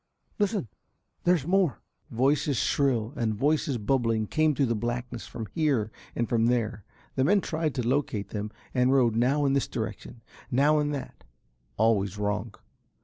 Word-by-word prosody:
Listen, 205 Hz, -, 0 dB, 0.6 s
there's 175 Hz, -5 st, +3 dB
more." 175 Hz, -, +2 dB, 0.3 s
Voices 135 Hz, +3 st, +1 dB
shrill 125 Hz, -4 st, +1 dB
and 115 Hz, -5 st, -1 dB
voices 145 Hz, +2 st, +1 dB
bubbling 115 Hz, -1 st, +1 dB
came 155 Hz, +6 st, +2 dB
through 140 Hz, -, +2 dB
the 115 Hz, -, 0 dB
blackness 120 Hz, -1 st, -4 dB
from 115 Hz, -2 st, -6 dB
here 135 Hz, -9 st, +1 dB, 0.2 s
and 120 Hz, -, 0 dB
from 115 Hz, -1 st, +2 dB
there. 115 Hz, -3 st, 0 dB, 0.3 s
The 130 Hz, -, +1 dB
men 200 Hz, +8 st, +4 dB
tried 160 Hz, -4 st, -2 dB
to 125 Hz, -3 st, -1 dB
locate 125 Hz, -6 st, 0 dB
them 105 Hz, 0 st, -4 dB, 0.2 s
and 125 Hz, 0 st, +3 dB
rowed 125 Hz, -5 st, +3 dB
now 135 Hz, +5 st, +2 dB
in 135 Hz, -, +2 dB
this 140 Hz, -, +1 dB
direction, 110 Hz, 0 st, -6 dB, 0.3 s
now 145 Hz, +4 st, +3 dB
in 145 Hz, 0 st, 0 dB
that 145 Hz, -2 st, -6 dB, 0.5 s
always 105 Hz, -3 st, +2 dB
wrong. 105 Hz, +1 st, -2 dB
125 Hz, 155 wpm, -27 LUFS, 110-145 Hz, 0.6 s, men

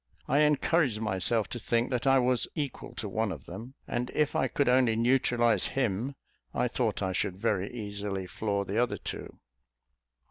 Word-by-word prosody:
I 140 Hz, -, +3 dB
encouraged 150 Hz, -4 st, +3 dB
myself 110 Hz, +1 st, 0 dB
to 120 Hz, -, -4 dB
think 120 Hz, +2 st, 0 dB
that 125 Hz, +2 st, 0 dB
I 135 Hz, 0 st, +6 dB
was 125 Hz, -1 st, +2 dB
equal 145 Hz, -4 st, -4 dB
to 110 Hz, -1 st, -4 dB
one 110 Hz, +1 st, -1 dB
of -, -, -7 dB
them; 115 Hz, +9 st, -8 dB
and 125 Hz, +1 st, -2 dB
if 150 Hz, -2 st, +1 dB
I 130 Hz, -, +2 dB
could 140 Hz, +2 st, 0 dB
only 125 Hz, -2 st, +4 dB
neutralise 120 Hz, -3 st, +3 dB
him, 125 Hz, +2 st, 0 dB, 0.4 s
I -, -, +2 dB
thought -, -, -1 dB
I 95 Hz, -, 0 dB
should 95 Hz, 0 st, -1 dB
very 100 Hz, 0 st, 0 dB
easily 100 Hz, -4 st, -4 dB
floor 100 Hz, +1 st, -2 dB
the 105 Hz, +5 st, +1 dB
other 125 Hz, -, 0 dB
two. -, -, -7 dB
115 Hz, 175 wpm, -29 LUFS, 100-130 Hz, 0.4 s, I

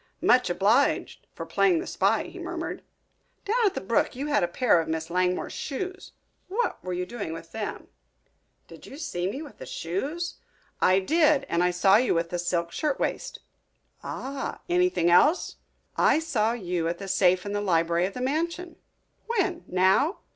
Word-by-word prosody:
"Much -, -, +4 dB
obliged -, -, +1 dB
for -, -, -6 dB
playing 365 Hz, -3 st, +2 dB
the 335 Hz, -, -3 dB
spy," -, -, +1 dB
he -, -, -10 dB
murmured. -, -, -5 dB, 0.6 s
"Down 450 Hz, +2 st, +2 dB
at 390 Hz, -, -1 dB
the -, -, -3 dB
brook 210 Hz, +6 st, 0 dB
you 270 Hz, +3 st, -4 dB
had 295 Hz, -1 st, +2 dB
a -, -, +2 dB
pair 180 Hz, -2 st, +3 dB
of 160 Hz, -, -6 dB
Miss 160 Hz, +1 st, -3 dB
Langmore's 180 Hz, 0 st, 0 dB
shoes. 370 Hz, +7 st, -5 dB, 0.3 s
What 455 Hz, +5 st, -2 dB
were 185 Hz, -, -4 dB
you 180 Hz, 0 st, -2 dB
doing 200 Hz, -6 st, -5 dB
with 165 Hz, 0 st, -9 dB
them?" 220 Hz, -2 st, -5 dB, 0.8 s
"Did -, -, -13 dB
you 275 Hz, -, -10 dB
see 180 Hz, -, -3 dB
me 270 Hz, +9 st, -5 dB
with 295 Hz, -, -13 dB
the -, -, -8 dB
shoes?" 285 Hz, -, -4 dB, 0.4 s
"I 185 Hz, -, +5 dB
did, 300 Hz, -, +3 dB
and 170 Hz, +1 st, +1 dB
I 180 Hz, -, +3 dB
saw 190 Hz, +3 st, +4 dB
you 245 Hz, -3 st, +2 dB
with 165 Hz, 0 st, -1 dB
the 175 Hz, -, -2 dB
silk 170 Hz, -1 st, -1 dB
shirtwaist." 295 Hz, -, -2 dB, 0.6 s
"Ah! 275 Hz, +1 st, -5 dB
Anything 355 Hz, -, +2 dB
else?" 295 Hz, -, +4 dB, 0.4 s
"I -, -, +4 dB
saw 235 Hz, -9 st, 0 dB
you 180 Hz, -7 st, -2 dB
at 170 Hz, +1 st, -2 dB
the 195 Hz, -, -7 dB
safe 185 Hz, -1 st, +3 dB
in 205 Hz, -, -4 dB
the 205 Hz, -, -1 dB
library 170 Hz, -2 st, +2 dB
of 195 Hz, -, -9 dB
the 250 Hz, -, -4 dB
mansion." 335 Hz, +5 st, -2 dB, 0.5 s
"When, 385 Hz, -7 st, 0 dB
now?" 190 Hz, -, +2 dB
210 Hz, 175 wpm, -26 LUFS, -, 0.8 s, I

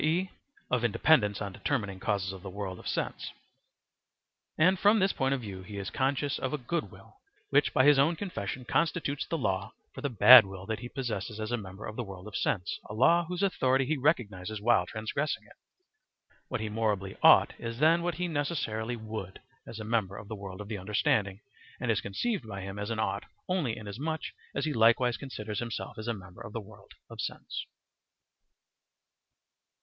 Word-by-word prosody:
e., 175 Hz, +5 st, +1 dB, 0.4 s
of 125 Hz, -2 st, +2 dB
independence 105 Hz, -2 st, +3 dB
on 100 Hz, -2 st, -5 dB
determining 100 Hz, -7 st, -2 dB
causes 95 Hz, -1 st, -1 dB
of 95 Hz, -, -9 dB
the 95 Hz, -, -7 dB
world 95 Hz, -1 st, -5 dB
of -, -, -9 dB
sense; -, -, -2 dB, 1.3 s
and 180 Hz, +4 st, +4 dB
from 210 Hz, +3 st, +5 dB
this 195 Hz, -1 st, +3 dB
point 135 Hz, -1 st, 0 dB
of 135 Hz, -2 st, 0 dB
view 100 Hz, -4 st, -7 dB
he 100 Hz, +2 st, -8 dB
is 100 Hz, -1 st, -4 dB
conscious 140 Hz, +1 st, 0 dB
of 130 Hz, -, -2 dB
a -, -, +1 dB
good 150 Hz, +6 st, -2 dB
will, -, -, -16 dB, 0.3 s
which -, -, +4 dB
by 130 Hz, -, +4 dB
his 145 Hz, -1 st, +7 dB
own 160 Hz, +5 st, +4 dB
confession 135 Hz, -, -5 dB
constitutes 160 Hz, -2 st, 0 dB
the 165 Hz, -, -1 dB
law 95 Hz, -9 st, -1 dB, 0.2 s
for -, -, -8 dB
the 140 Hz, -, -1 dB
bad 125 Hz, +2 st, +10 dB
will 95 Hz, -1 st, -9 dB
that 110 Hz, +1 st, -3 dB
he 120 Hz, +1 st, -7 dB
possesses 110 Hz, -5 st, -4 dB
as 110 Hz, +1 st, -3 dB
a -, -, +2 dB
member 100 Hz, -2 st, -8 dB
of 110 Hz, -, -6 dB
the 120 Hz, -, -2 dB
world 95 Hz, -2 st, -9 dB
of 105 Hz, -, -8 dB
sense 90 Hz, -5 st, -1 dB
a 105 Hz, -, -5 dB
law 170 Hz, +9 st, +5 dB
whose 180 Hz, +2 st, -2 dB
authority 135 Hz, -8 st, +2 dB
he 155 Hz, +4 st, +1 dB
recognizes 110 Hz, -, 0 dB
while 120 Hz, +3 st, +3 dB
transgressing 130 Hz, +7 st, -2 dB
it. -, -, -18 dB, 0.9 s
What -, -, -3 dB
he 110 Hz, -, -2 dB
morally 105 Hz, -3 st, -1 dB
"ought" -, -, +7 dB
is 115 Hz, 0 st, -5 dB
then 160 Hz, +5 st, +4 dB
what 175 Hz, 0 st, -1 dB
he 180 Hz, 0 st, -1 dB
necessarily 140 Hz, -7 st, -2 dB
"would," 110 Hz, -4 st, -6 dB, 0.3 s
as 115 Hz, -, -8 dB
a -, -, -5 dB
member 105 Hz, -3 st, -1 dB
of 100 Hz, -, -9 dB
the 110 Hz, -, -5 dB
world 100 Hz, -1 st, -8 dB
of 105 Hz, -, -8 dB
the 105 Hz, -2 st, -4 dB
understanding, 100 Hz, 0 st, +1 dB, 0.4 s
and -, -, 0 dB
is -, -, +1 dB
conceived 135 Hz, -, -2 dB
by 95 Hz, -2 st, -6 dB
him 95 Hz, +1 st, -6 dB
as 105 Hz, +1 st, -3 dB
an 115 Hz, -, -2 dB
"ought" 110 Hz, -, -1 dB, 0.2 s
only 170 Hz, -11 st, 0 dB
inasmuch 130 Hz, +10 st, -4 dB, 0.3 s
as 140 Hz, -, 0 dB
he 155 Hz, -, -1 dB
likewise 120 Hz, +1 st, +4 dB
considers 110 Hz, -6 st, -5 dB
himself 115 Hz, -2 st, -5 dB
as 110 Hz, -, -6 dB
a 120 Hz, -, +1 dB
member 95 Hz, +1 st, -12 dB
of 105 Hz, -2 st, -8 dB
the 115 Hz, -, -2 dB
world 105 Hz, 0 st, -14 dB
of -, -, -7 dB
sense. -, -, -5 dB
115 Hz, 195 wpm, -30 LUFS, 100-140 Hz, 1.3 s, bad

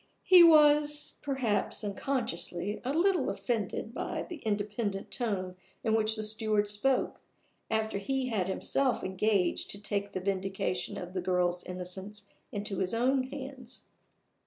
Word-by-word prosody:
He 365 Hz, -2 st, +8 dB
was 295 Hz, -2 st, +5 dB
(perhaps 260 Hz, -8 st, -1 dB
unconsciously) 205 Hz, -4 st, -2 dB
a 255 Hz, -, -1 dB
little 360 Hz, +5 st, +2 dB
offended 225 Hz, -1 st, -2 dB
by -, -, -3 dB
the 345 Hz, -, -7 dB
independent 205 Hz, -3 st, -2 dB
tone 190 Hz, -7 st, -2 dB, 0.3 s
in 220 Hz, -, +1 dB
which 220 Hz, 0 st, +3 dB
the 215 Hz, -, -2 dB
steward 215 Hz, -1 st, +1 dB
spoke, 230 Hz, +6 st, 0 dB, 0.5 s
after 220 Hz, -2 st, 0 dB
he 265 Hz, +4 st, -1 dB
had 200 Hz, -6 st, 0 dB
himself 255 Hz, +7 st, 0 dB
engaged 190 Hz, -1 st, +1 dB
to 200 Hz, -, -2 dB
take 200 Hz, 0 st, -3 dB
the -, -, -2 dB
vindication 190 Hz, -1 st, -2 dB
of 180 Hz, 0 st, -7 dB
the 185 Hz, -, -2 dB
girl's 180 Hz, -1 st, 0 dB
innocence 190 Hz, +3 st, -4 dB, 0.2 s
into 205 Hz, -1 st, -3 dB
his 190 Hz, +3 st, +1 dB
own 255 Hz, +2 st, +2 dB
hands. 265 Hz, -3 st, -8 dB
215 Hz, 135 wpm, -30 LUFS, 195-260 Hz, 0.5 s, He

